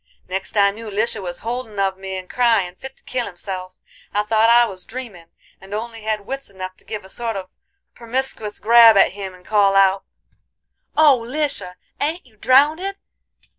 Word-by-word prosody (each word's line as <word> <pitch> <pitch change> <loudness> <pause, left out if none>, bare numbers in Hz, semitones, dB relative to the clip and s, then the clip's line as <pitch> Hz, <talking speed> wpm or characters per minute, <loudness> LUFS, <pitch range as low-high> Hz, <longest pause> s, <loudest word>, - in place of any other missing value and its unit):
Next 190 +3 -4
I 200 -1 +5
knew 220 +2 -9
Lisha 215 +1 -1
was 175 -2 -6
holdin' 235 -3 -4
of 195 -1 +1
me 190 0 -6
and 185 0 -8
cryin' 225 -7 +2
fit 265 +8 -11
to - - -18
kill 250 -2 -2
himself. 185 0 -7 0.4
I 210 - +2
thought 220 +1 +3
I 240 +1 +6
was 190 -5 -6
dreamin', 220 -9 -9 0.3
and 195 +2 -7
only 225 +1 -5
had 215 -1 -2
wits 275 +3 -5
enough 185 -1 -7
to - - -19
give 210 -3 -6
a - - -11
sort 230 +2 -3
of 185 -1 -6 0.4
permiscuous 235 -3 -3
grab 230 -1 +7
at - - +5
him 190 -1 -7
and 180 0 -20
call 200 -2 +3
out: 195 0 +4 0.9
"'Oh, 285 -6 +5
Lisha! 255 -8 -3 0.2
ain't 315 +3 -2
you 235 -4 -23
drownded? 300 - +3
215 Hz, 180 wpm, -21 LUFS, 190-240 Hz, 0.9 s, grab